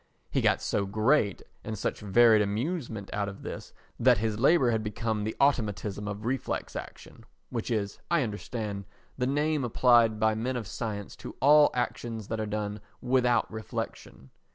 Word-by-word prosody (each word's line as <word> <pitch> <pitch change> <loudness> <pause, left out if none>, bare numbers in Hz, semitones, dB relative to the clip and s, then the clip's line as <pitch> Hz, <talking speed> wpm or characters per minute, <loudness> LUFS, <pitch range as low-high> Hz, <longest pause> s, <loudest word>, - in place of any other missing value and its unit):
He - - +1
got - - +2
so 100 -1 0
great 110 +1 +2 0.2
and 110 -1 -5
such - - -2
varied 110 +2 +5
amusement 110 - -3
out 100 -1 -1
of 100 - -11
this - - -7 0.3
that - - +5
his 110 +1 -1
labour 135 -1 +4
had 110 -1 0
become 110 0 -2
the 110 - -3
automatism 105 -6 0
of 105 +1 -5
reflex 130 +2 -2
action—which 115 +1 -8
is, 105 -3 -2
I 170 -4 +3
understand, 105 -2 -4 0.3
the 125 - +1
name 150 +1 +1
applied 120 -2 +4
by 110 0 +3
men 120 +4 -2
of 115 - -4
science 105 -1 -5
to - - -9
all 150 +2 +7
actions 115 -3 -3
that 110 - -2
are 110 - -2
done 105 0 -3 0.2
without 125 -1 +2
reflection. 95 -9 -6
110 Hz, 160 wpm, -28 LUFS, 105-125 Hz, 0.3 s, all